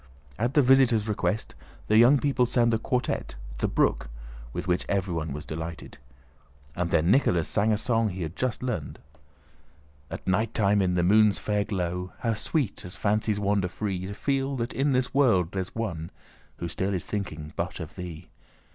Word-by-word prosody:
At 120 +4 0
the 145 - +6
visitors' 125 -4 +4
request 105 0 -1 0.3
the 110 - +2
young 120 +6 +7
people 135 -3 +1
sang 120 -1 +2
the 115 - +1
quartette, 125 - -2 0.2
"The - - +1
Brook," - - +1 0.4
with 90 - -5
which 90 0 +1
everyone 90 -6 -1
was 75 +2 -6
delighted. 80 -1 -7 0.8
Then 85 0 +2
Nicholas 90 - +3
sang 110 +1 +1
a 105 - +2
song 115 0 +1
he 90 -1 -4
had 80 +2 -6
just 125 -1 -2
learned: 110 - -3 1.1
At - - -7
nighttime 105 +1 +2
in 90 -1 +1
the 90 - +2
moon's 105 +1 +5
fair 105 -1 0
glow 90 -2 -3
How 115 -2 +1
sweet, 115 - -2
as 90 - -9
fancies 105 0 0
wander 100 -2 +1
free, 95 -1 -3
To 100 - -6
feel 135 +2 -1
that 120 -1 -3
in 140 +1 +1
this 125 -1 0
world 110 -11 +3
there's 95 -1 -4
one 85 -8 -3 0.5
Who 85 - -4
still 95 +4 -2
is 90 - -4
thinking 80 -7 -5
but 90 +2 -3
of 80 -1 -7
thee! 90 -4 -8
100 Hz, 175 wpm, -27 LUFS, 90-115 Hz, 1.1 s, young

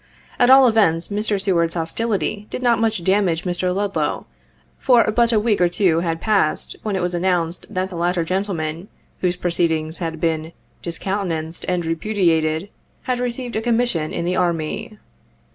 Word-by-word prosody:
At 245 - +5
all 265 0 +8
events, 200 -8 +3
Mr. 205 0 -1
Seward's 175 -4 +1
hostility 205 +3 -2
did 255 - -5
not 235 -2 +3
much 220 -5 0
damage 190 -3 +1
Mr. 180 0 0
Ludlow, 200 +1 -1 0.5
for 245 -3 +5
but 235 +1 +3
a 220 - +3
week 210 -3 +1
or 175 - +4
two 175 -3 +2
had 165 -1 -2
passed, 205 -7 0
when 210 -2 -2
it 185 - -1
was 180 0 -1
announced 175 -1 -1
that 185 +1 -3
the - - -7
latter 175 0 0
gentleman, 175 -2 -3 0.3
whose 180 -1 0
proceedings 165 -2 0
had 165 -2 -4
been 160 0 -1 0.3
"discountenanced 170 -2 -2
and 180 -1 0
repu 165 +6 -3
diated," 160 0 +1 0.3
had 250 -1 -1
received 245 0 -3
a 220 - 0
commission 230 -9 0
in 170 - -3
the 180 +1 0
Army. 170 +3 -2
180 Hz, 165 wpm, -21 LUFS, 165-210 Hz, 0.5 s, all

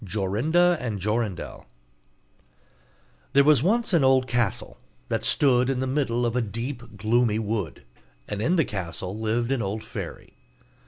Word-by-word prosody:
JORINDA 115 - +2
AND 110 -5 -3
JORINDEL 105 -2 -3 1.7
There 140 - +6
was 150 -3 +5
once 220 - +1
an 165 -5 +4
old 130 -1 +4
castle, 120 -4 -2 0.3
that - - -1
stood 125 -3 +3
in 135 -2 0
the 130 - 0
middle 130 -3 0
of 120 0 -1
a 125 - +2
deep 115 +1 -6
gloomy 110 +1 +2
wood, 105 -6 -3 0.4
and 105 0 -4
in 165 +11 +2
the 160 -5 +3
castle 95 -1 -5
lived 115 +3 -1
an 135 -3 +1
old 105 +2 -3
fairy. - - -8
120 Hz, 150 wpm, -25 LUFS, 105-135 Hz, 1.7 s, There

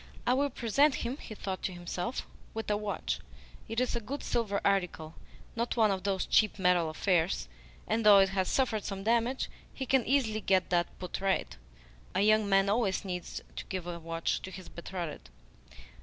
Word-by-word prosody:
"I 245 - +4
will 285 +2 +2
present 270 +4 +3
him," 250 +4 -2
he 220 - -9
thought 190 -2 -4
to - - -2
himself, 175 +6 -4 0.3
"with 225 -1 -2
a - - +3
watch. 205 -1 -2 0.5
It 225 - -1
is 255 -1 0
a - - +1
good 270 +6 -5
silver 215 -4 0
article 180 -5 0 0.4
not 235 +1 -1
one 220 -3 +5
of 190 -1 -1
those 195 -2 0
cheap 215 -2 +3
metal 180 -3 +3
affairs; 170 - +1 0.4
and 225 +1 +1
though 210 -1 +9
it 195 0 +6
has 190 -1 0
suffered 225 -6 +1
some 195 -1 -4
damage, 235 +4 +1 0.2
he 265 - -5
can 265 -1 +3
easily 225 -5 +2
get 190 -2 +2
that 175 -1 +1
put 180 +1 -5
right. 195 -1 0 0.6
A 190 - +3
young 215 0 +4
man 195 0 +4
always 200 -2 +1
needs 180 -2 -5
to - - -4
give 185 -3 -4
a 175 -1 -5
watch 165 0 -2
to - - -7
his 185 -1 -9
betrothed." 170 - -6
200 Hz, 185 wpm, -31 LUFS, 185-230 Hz, 0.6 s, though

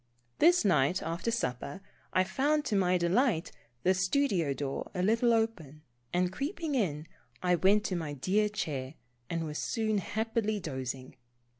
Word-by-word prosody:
This 345 -5 +5
night 170 -1 +3
after 165 +7 -2
supper, 140 - -2 0.3
I 185 - +3
found, 290 +9 +1
to 210 - 0
my 185 -2 +3
delight, 180 - +1 0.3
the 185 - +4
studio 190 - +1
door 135 0 -3
a 180 - 0
little 230 +4 +3
open, 205 -11 -1 0.3
and 180 +1 +1
creeping 310 - -3
in, 160 - 0 0.4
I 180 0 +3
went 195 +5 +4
to 190 - -2
my 160 -4 -3
dear 200 +10 +1
chair, 145 -9 -4 0.3
and 165 -1 -1
was 150 -1 -4
soon 215 -2 0
happily 220 +2 -1
dozing. 130 -6 -5
185 Hz, 150 wpm, -30 LUFS, 155-225 Hz, 0.4 s, This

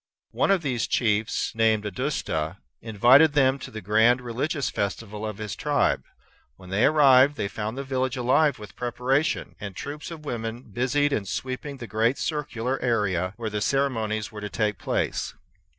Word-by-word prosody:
One - - +1
of 195 -3 +3
these 125 -5 -1
chiefs, 110 -2 0
named 110 -1 +2
Audusta, 100 - -2 0.2
invited 125 +8 +5
them 135 -2 +3
to - - -8
the 110 - -7
grand 110 +5 +4
religious 130 +4 -2
festival 105 +1 -3
of 105 -2 -4
his 105 -2 -5
tribe. - - +1 0.5
When 90 0 -13
they 105 +5 +3
arrived, 140 -2 +6
they 100 - -2
found 110 +4 -5
the 140 - -3
village 130 -1 -1
alive 130 +3 +3
with 105 -2 -11
preparation, 125 +5 -1
and 100 -3 -7
troops 150 +2 -6
of 160 -3 -9
women 115 -2 -4
busied 130 +6 0
in 105 - -1
sweeping 130 +8 -4
the 120 - -7
great 115 +5 +1
circular 135 -4 -2
area 95 -7 0
where 115 -2 -4
the 105 0 -2
ceremonies 110 -5 0
were 105 -1 -8
to 105 - -4
take 105 -2 -1
place. - - -2
120 Hz, 165 wpm, -25 LUFS, 105-135 Hz, 0.5 s, arrived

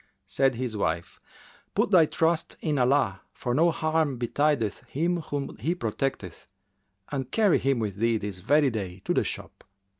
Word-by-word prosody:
'" - - -49
Said 135 -2 +1
his 120 -2 -3
wife, 85 -4 -2 0.6
"Put - - +2
thy 170 -5 +6
trust 165 +1 0
in 150 -4 -1
Allah, 125 -7 +2
for 120 - -2
no 165 +6 +4
harm 155 -4 0
betideth 125 -2 0
him 170 +5 0
whom 145 -4 -4
He 155 +11 -1
protecteth, 110 - -3 0.6
and 135 -3 -3
carry 210 -1 +3
him 135 -1 +1
with 105 -4 -3
thee 115 +1 +2
this 105 -3 -5
very 145 +6 +3
day 95 -4 -5
to - - +1
the - - +2
shop." - - -7
135 Hz, 170 wpm, -27 LUFS, 110-155 Hz, 0.6 s, thy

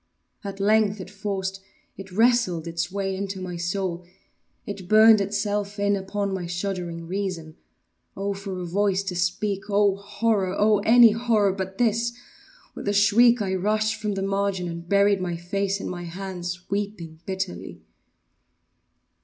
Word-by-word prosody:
At 200 -1 -6
length 210 0 +3
it 185 +1 -8
forced—it 195 -1 -6
wrestled 225 -5 +2
its 170 +2 -3
way 195 -1 -2
into 195 0 -4
my 180 -1 -5
soul—it 180 +2 -6
burned 215 0 +7
itself 205 0 -2
in 205 0 +2
upon 200 +1 -3
my 180 -2 -3
shuddering 175 -2 -4
reason. 180 -4 -4 0.6
Oh! 200 +1 -1
for 195 -1 -6
a 180 - -4
voice 195 +2 +1
to 190 -2 -4
speak!—oh! 200 +2 +1
horror!—oh! 205 0 +1
any 230 +2 +7
horror 220 -3 +2
but 190 0 -5
this! 235 0 +1 0.6
With - - -8
a 205 - +2
shriek, 220 +3 +5
I 190 -1 -2
rushed 215 +3 +1
from 210 -1 -1
the 195 - -2
margin, 195 -2 -1
and 170 0 -7
buried 200 -1 +3
my 175 -2 -2
face 195 +3 -2
in - - -5
my 175 -1 -5
hands—weeping 180 -1 -5
bitterly. 190 -1 -5
195 Hz, 135 wpm, -25 LUFS, 185-205 Hz, 0.6 s, burned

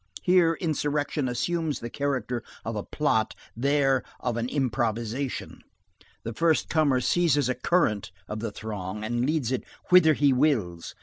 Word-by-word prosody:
Here 180 -2 +4
insurrection 150 -3 -1
assumes 160 +4 -1
the 120 - -6
character 130 -4 -2 0.2
of 115 0 -3
a 105 - -2
plot; 110 -4 0 0.2
there 135 +1 +2 0.2
of 125 -2 -2
an 115 +1 -2
improvisation. 120 -1 -2 0.6
The 115 - -4
first 160 +6 +2
comer 145 -6 +2
seizes 145 -2 +2
a - - +2
current 125 - +1 0.2
of 105 - -4
the 115 -1 -3
throng 105 -1 -5
and 120 +3 0
leads 150 -6 0
it 130 - -1 0.3
whither 180 -3 +7
he 140 -1 +4
wills. 115 - 0
130 Hz, 145 wpm, -26 LUFS, 115-150 Hz, 0.6 s, whither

